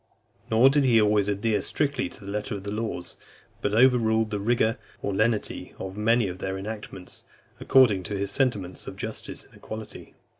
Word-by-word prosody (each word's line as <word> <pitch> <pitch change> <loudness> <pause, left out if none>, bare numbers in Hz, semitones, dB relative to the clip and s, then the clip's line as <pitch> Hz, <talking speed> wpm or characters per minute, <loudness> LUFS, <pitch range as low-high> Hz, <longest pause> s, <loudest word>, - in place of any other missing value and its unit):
Nor 120 +4 +6
did 145 0 +3
he 120 -4 +5
always 105 -1 +3
adhere 105 +1 0
strictly 140 -3 -1
to 100 - -11
the 100 - -5
letter 105 +2 -3
of 100 - -7
the 100 - -4
laws, 105 -5 -4 0.4
but 105 +1 0
overruled 110 -3 +4
the 105 - -1
rigour 115 +2 +1 0.2
or 100 - -1
lenity 110 +1 -1
of 95 0 -6
many 115 +1 +2
of 90 0 -6
their 95 0 -3
enactments, 100 -2 -8 0.4
according 120 -8 +5
to 100 - -3
his 100 0 -2
sentiments 100 -8 -1
of - - -6
justice - - -6
and - - -23
equity. 110 -1 -9
110 Hz, 180 wpm, -26 LUFS, 100-115 Hz, 0.4 s, Nor